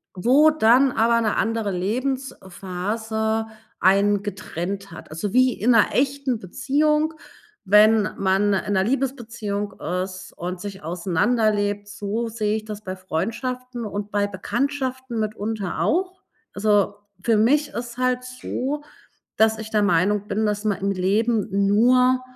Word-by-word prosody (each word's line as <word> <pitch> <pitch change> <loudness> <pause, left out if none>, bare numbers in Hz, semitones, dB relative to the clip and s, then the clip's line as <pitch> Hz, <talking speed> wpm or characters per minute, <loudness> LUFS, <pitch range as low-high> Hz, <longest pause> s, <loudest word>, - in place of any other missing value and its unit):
wo 270 +11 +5
dann 260 -1 +4
aber 230 +1 +3
'ne 215 -2 0
andere 225 -2 0
Lebensphase 220 -1 -2 0.3
einen 200 +2 +3
getrennt 195 -1 -5
hat. 165 - -11
Also, 175 +6 -4
wie 255 0 +4
in 240 +4 +1
'ner 230 -3 +4
echten 270 -2 0
Beziehung 300 - +1 0.5
wenn 210 +1 +5
man 195 +1 +2
in 200 +1 -1
'ner 190 - +3
Liebesbeziehung 230 -5 -3 0.2
ist 185 -1 -9
und 180 +1 -5
sich 195 -2 -8
auseinanderlebt, 205 +4 0
so 210 +3 -3
sehe 215 -1 -1
ich 215 - -8
das 210 -1 -7
bei 185 -1 -5
Freundschaften 235 +7 -4
und 205 0 -5
bei 205 0 +1
Bekanntschaften 260 +4 -3
mitunter 215 -2 -3
auch. 370 +3 0 0.3
Also, 205 -1 +2 0.3
für 225 -2 +3
mich 285 +7 +3
ist 240 0 -6
halt 255 0 0
so, 260 +3 -4 0.5
dass 220 0 +4
ich 220 0 -8
der 210 -1 +2
Meinung 200 +2 +2
bin, 215 +2 0
dass 210 0 -1
man 205 -3 +1
im 200 - 0
Leben 205 +4 +1 0.2
nur 250 +5 +4
215 Hz, 135 wpm, -23 LUFS, 200-250 Hz, 0.5 s, wo